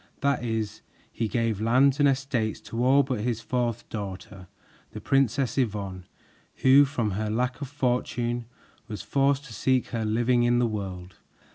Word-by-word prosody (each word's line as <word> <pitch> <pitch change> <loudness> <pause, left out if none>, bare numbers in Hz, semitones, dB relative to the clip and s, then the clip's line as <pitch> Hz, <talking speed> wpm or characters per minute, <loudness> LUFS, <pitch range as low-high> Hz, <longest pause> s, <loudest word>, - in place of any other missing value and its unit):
That 140 -4 +1
is, 110 -2 -3 0.3
he 115 - -2
gave 115 -2 -1
lands 130 +5 +3
and 145 -1 +5
estates 130 -5 -1
to 115 +1 -3
all 135 +3 +5
but 130 -4 -3
his 115 +1 -1
fourth 120 -1 -2
daughter, 95 -2 -7 0.5
the - - -6
Princess 135 0 +1
Yvonne, 100 -6 -2 0.6
who 135 +2 +7
from 125 -6 -2
her 105 +3 -2
lack 125 +5 -1
of 140 - -3
fortune 120 -3 -1 0.4
was 105 -3 -6
forced 140 +1 +1
to 125 - -10
seek 130 +4 +1
her 115 -2 -2
living 120 +3 +2
in 120 0 +3
the 120 - +3
world. 95 -4 -5
120 Hz, 160 wpm, -26 LUFS, 110-130 Hz, 0.6 s, who